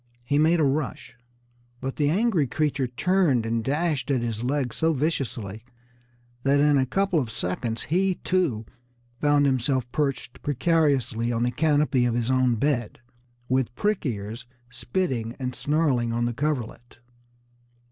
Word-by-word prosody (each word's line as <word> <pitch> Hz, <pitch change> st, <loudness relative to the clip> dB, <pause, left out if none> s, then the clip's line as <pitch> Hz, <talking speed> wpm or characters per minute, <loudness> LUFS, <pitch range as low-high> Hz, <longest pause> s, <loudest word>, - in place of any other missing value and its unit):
He 145 Hz, +4 st, +1 dB
made 165 Hz, +3 st, +4 dB
a -, -, +3 dB
rush, 140 Hz, -3 st, -2 dB, 0.6 s
but 130 Hz, +1 st, -5 dB
the 145 Hz, -1 st, +2 dB
angry 185 Hz, -, +2 dB
creature 140 Hz, -1 st, 0 dB
turned 140 Hz, -1 st, +1 dB
and 115 Hz, 0 st, -1 dB
dashed 145 Hz, -1 st, -1 dB
at 130 Hz, -4 st, +1 dB
his 115 Hz, -1 st, -3 dB
legs 130 Hz, -2 st, -1 dB
so 160 Hz, 0 st, +2 dB
viciously 125 Hz, -8 st, -2 dB, 0.8 s
that 140 Hz, +2 st, +3 dB
in 145 Hz, 0 st, +4 dB
a 130 Hz, -, +1 dB
couple 195 Hz, +2 st, +1 dB
of 125 Hz, -6 st, -2 dB
seconds 110 Hz, +4 st, -3 dB
he, 185 Hz, +4 st, +1 dB
too, 165 Hz, -15 st, 0 dB, 0.5 s
found 145 Hz, -1 st, +3 dB
himself 130 Hz, -1 st, 0 dB
perched 135 Hz, -5 st, -2 dB
precariously 135 Hz, -5 st, +1 dB
on 115 Hz, 0 st, 0 dB
the 125 Hz, -, +1 dB
canopy 145 Hz, -2 st, +2 dB
of 120 Hz, -1 st, 0 dB
his 120 Hz, +1 st, 0 dB
own 130 Hz, -2 st, +3 dB
bed, 120 Hz, -2 st, -1 dB, 0.5 s
with 130 Hz, -2 st, 0 dB
"prick 210 Hz, +1 st, 0 dB
ears" 115 Hz, -1 st, -4 dB, 0.2 s
spitting 120 Hz, -2 st, -2 dB
and 130 Hz, -2 st, -3 dB
snarling 140 Hz, -6 st, +1 dB
on 120 Hz, +1 st, 0 dB
the 120 Hz, -, -1 dB
coverlet. 125 Hz, -4 st, -3 dB
130 Hz, 145 wpm, -25 LUFS, 120-150 Hz, 0.8 s, made